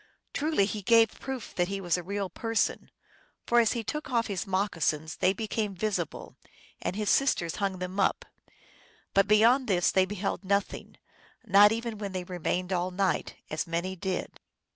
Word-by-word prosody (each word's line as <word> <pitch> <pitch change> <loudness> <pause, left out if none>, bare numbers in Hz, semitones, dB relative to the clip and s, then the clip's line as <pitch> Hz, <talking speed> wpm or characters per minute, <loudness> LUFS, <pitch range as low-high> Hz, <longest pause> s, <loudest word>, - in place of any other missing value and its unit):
Truly 300 -9 +1
he 210 +1 -4
gave 225 +2 +4
proof 265 -4 -6
that 175 -1 0
he 195 +1 -3
was 175 -3 0
a 180 - -2
real 200 +2 -3
person, 225 +5 -1 0.6
for 240 - +4
as 230 -2 +3
he 235 -2 -3
took 300 +5 -4
off 235 -3 +1
his 200 -1 -3
moccasins 165 -5 -1
they 185 - +3
became 210 0 -3
visible, 185 -4 -3 0.5
and - - -2
his 210 0 -2
sister 265 -11 +2
hung 195 -2 -1
them 185 +2 -5
up; 195 - +1 0.9
but 195 0 +4
beyond 230 +5 +5
this 180 -4 +2
they 190 -1 +3
beheld 200 +1 -3
nothing 200 +1 -2 0.5
not 205 +2 +7
even 230 -1 -3
when 200 -2 -5
they 185 -1 -3
remained 180 +1 -2
all 180 0 0
night, 185 +1 -1 0.2
as 155 +4 -2
many 170 +3 -2
did. 190 0 -4
195 Hz, 170 wpm, -28 LUFS, 185-220 Hz, 0.9 s, not